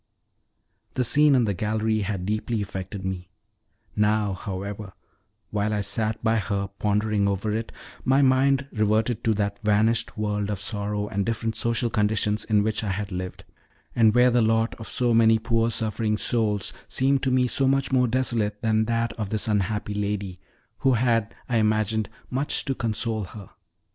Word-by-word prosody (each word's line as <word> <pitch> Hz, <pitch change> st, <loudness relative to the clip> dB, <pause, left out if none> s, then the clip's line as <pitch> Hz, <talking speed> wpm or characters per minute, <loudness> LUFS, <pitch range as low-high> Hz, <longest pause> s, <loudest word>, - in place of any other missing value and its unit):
The 125 Hz, -, +1 dB
scene 145 Hz, +3 st, +5 dB
in 125 Hz, -, +4 dB
the 105 Hz, -3 st, 0 dB
gallery 110 Hz, +3 st, 0 dB
had 100 Hz, -3 st, -3 dB
deeply 110 Hz, +2 st, -1 dB
affected 95 Hz, -1 st, -5 dB
me; 90 Hz, -1 st, -4 dB, 0.7 s
now, 105 Hz, -1 st, +2 dB
however, 100 Hz, +1 st, -6 dB, 0.6 s
while 105 Hz, 0 st, 0 dB
I 105 Hz, -, 0 dB
sat 110 Hz, +2 st, -1 dB
by 115 Hz, 0 st, +2 dB
her, 100 Hz, -1 st, -2 dB
pondering 105 Hz, 0 st, +1 dB
over 100 Hz, +2 st, -1 dB
it, 115 Hz, +1 st, -3 dB, 0.3 s
my 135 Hz, +2 st, +3 dB
mind 135 Hz, +1 st, +3 dB
reverted 110 Hz, +1 st, +1 dB
to 110 Hz, -1 st, +3 dB
that 100 Hz, +1 st, -2 dB
vanished 110 Hz, +2 st, +1 dB
world 105 Hz, -1 st, -1 dB
of 105 Hz, -2 st, -2 dB
sorrow 105 Hz, 0 st, -3 dB
and 100 Hz, -1 st, -1 dB
different 115 Hz, 0 st, -2 dB
social 115 Hz, 0 st, 0 dB
conditions 105 Hz, 0 st, +1 dB
in 105 Hz, -2 st, +2 dB
which 110 Hz, +1 st, -1 dB
I 105 Hz, -, -2 dB
had 100 Hz, +1 st, -3 dB
lived, 90 Hz, 0 st, -5 dB, 0.5 s
and 115 Hz, -2 st, +4 dB
where 125 Hz, +1 st, +5 dB
the 120 Hz, 0 st, +3 dB
lot 115 Hz, +1 st, +2 dB
of 110 Hz, -, -8 dB
so 120 Hz, -2 st, +1 dB
many 115 Hz, 0 st, +5 dB
poor 115 Hz, 0 st, +1 dB
suffering 110 Hz, -1 st, 0 dB
souls 105 Hz, -3 st, 0 dB
seemed 135 Hz, +1 st, +1 dB
to 135 Hz, -, 0 dB
me 130 Hz, 0 st, +3 dB
so 135 Hz, +2 st, +1 dB
much 135 Hz, 0 st, +1 dB
more 125 Hz, -1 st, +3 dB
desolate 115 Hz, -4 st, 0 dB
than 110 Hz, 0 st, +2 dB
that 115 Hz, +1 st, -1 dB
of 105 Hz, -3 st, -2 dB
this 110 Hz, +1 st, 0 dB
unhappy 105 Hz, 0 st, -1 dB
lady, 100 Hz, -3 st, -3 dB, 0.4 s
who 135 Hz, -1 st, +3 dB
had, 115 Hz, -2 st, +1 dB
I 120 Hz, -, +1 dB
imagined, 110 Hz, 0 st, +1 dB, 0.2 s
much 135 Hz, +3 st, 0 dB
to 135 Hz, -, 0 dB
console 115 Hz, -3 st, -1 dB
her. 100 Hz, +2 st, -11 dB
110 Hz, 170 wpm, -25 LUFS, 105-115 Hz, 0.7 s, scene